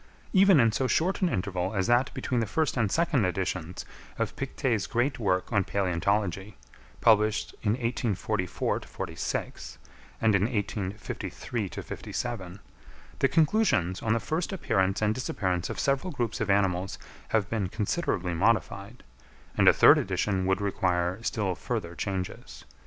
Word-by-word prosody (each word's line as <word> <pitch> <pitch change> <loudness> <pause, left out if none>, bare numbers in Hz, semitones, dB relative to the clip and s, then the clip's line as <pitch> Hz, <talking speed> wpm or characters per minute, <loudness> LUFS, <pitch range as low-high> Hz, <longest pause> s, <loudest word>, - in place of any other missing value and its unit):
Even 190 -4 +6
in 115 -2 +5
so 130 +5 0
short 180 +10 +1
an 185 - +3
interval 95 - -2
as 95 -1 +1
that 120 +2 +3
between 125 - -1
the 115 - 0
first 160 +3 0
and 115 -6 +1
second 160 -6 +2
editions 90 -2 -2 0.3
of - - -2
Pictet's 130 -5 -1
great 125 +3 0
work 95 0 0
on 100 -2 +3
Palæontology, 95 +1 -1 0.5
published 110 -1 +3
in 105 -1 +1
1844 110 -5 -1
46 - - -5 0.4
and 110 -1 +3
in 100 0 +3
1853 105 0 -3
57, 95 -1 -5 0.6
the - - +4
conclusions 155 - +2
on 110 - +1
the 115 - +1
first 160 - -2
appearance 95 - 0
and 105 0 +3
disappearance 95 -8 -2
of - - -5
several 140 +6 0
groups 120 -8 -2
of 105 - -1
animals 95 -2 +1 0.3
have 110 -3 +1
been 105 -4 -2
considerably 100 - -1
modified; 100 +3 0 0.5
and - - +3
a - - +11
third - - +7
edition 95 -3 -1
would 95 +1 +1
require 90 -1 0
still 105 -4 -1
further 100 -3 -4
changes. 95 0 -5
105 Hz, 140 wpm, -28 LUFS, 95-120 Hz, 0.6 s, a